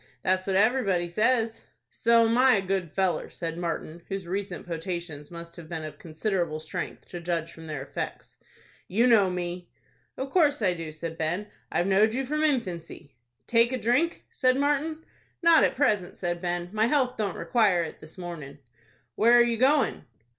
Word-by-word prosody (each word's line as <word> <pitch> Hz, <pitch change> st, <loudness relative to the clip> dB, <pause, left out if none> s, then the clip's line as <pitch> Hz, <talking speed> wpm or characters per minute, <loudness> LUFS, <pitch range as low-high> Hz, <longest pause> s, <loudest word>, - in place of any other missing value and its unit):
"That's 185 Hz, 0 st, +1 dB
what 190 Hz, -, +1 dB
everybody 200 Hz, -5 st, +2 dB
says." 225 Hz, +4 st, +1 dB, 0.3 s
"So'm 230 Hz, 0 st, +4 dB
I 255 Hz, -1 st, +6 dB
a 195 Hz, -, +1 dB
good 190 Hz, -2 st, -1 dB
feller," 190 Hz, -2 st, 0 dB
said 165 Hz, -1 st, -5 dB
Martin, 170 Hz, -1 st, -4 dB
whose 195 Hz, -2 st, -4 dB
recent 195 Hz, +3 st, -4 dB
potations 165 Hz, -3 st, -5 dB
must 170 Hz, 0 st, -10 dB
have 165 Hz, -2 st, -10 dB
been 160 Hz, -2 st, -4 dB
of 155 Hz, -, -8 dB
considerable 170 Hz, -1 st, -2 dB
strength, 160 Hz, +3 st, -6 dB
to 175 Hz, -, -6 dB
judge 170 Hz, -1 st, -2 dB
from 160 Hz, 0 st, -11 dB
their 150 Hz, -3 st, -4 dB
effects. -, -, -6 dB, 0.5 s
"You 225 Hz, +6 st, +2 dB
know 220 Hz, -6 st, +5 dB
me." 180 Hz, 0 st, -4 dB, 0.5 s
"Of 265 Hz, +1 st, -4 dB
course 300 Hz, -5 st, +3 dB
I 185 Hz, -3 st, +3 dB
do," 165 Hz, -2 st, -6 dB
said 160 Hz, +1 st, -7 dB
Ben. 175 Hz, +6 st, -2 dB, 0.2 s
"I've 175 Hz, -, +1 dB
knowed 210 Hz, +4 st, +3 dB
you 270 Hz, +1 st, -1 dB
from 305 Hz, +3 st, -1 dB
infancy." 175 Hz, -, -2 dB, 0.3 s
"Take 235 Hz, +1 st, +3 dB
a 260 Hz, -, 0 dB
drink?" 255 Hz, +9 st, +1 dB
said 255 Hz, -1 st, +2 dB
Martin. 295 Hz, +3 st, 0 dB, 0.4 s
"Not 335 Hz, -1 st, +7 dB
at -, -, +2 dB
present," 210 Hz, -10 st, +1 dB
said 175 Hz, -1 st, -2 dB
Ben. 175 Hz, 0 st, -2 dB
"My 220 Hz, +1 st, +2 dB
health 255 Hz, -2 st, +1 dB
don't 205 Hz, -4 st, -2 dB
require 205 Hz, -8 st, +2 dB
it 160 Hz, -, -7 dB
this 155 Hz, +3 st, -13 dB
mornin'." 165 Hz, -6 st, -7 dB, 0.6 s
"Where 235 Hz, +3 st, +5 dB
are 240 Hz, -, +7 dB
you 235 Hz, -1 st, 0 dB
going?" 270 Hz, -, +2 dB
190 Hz, 175 wpm, -27 LUFS, 170-240 Hz, 0.6 s, Not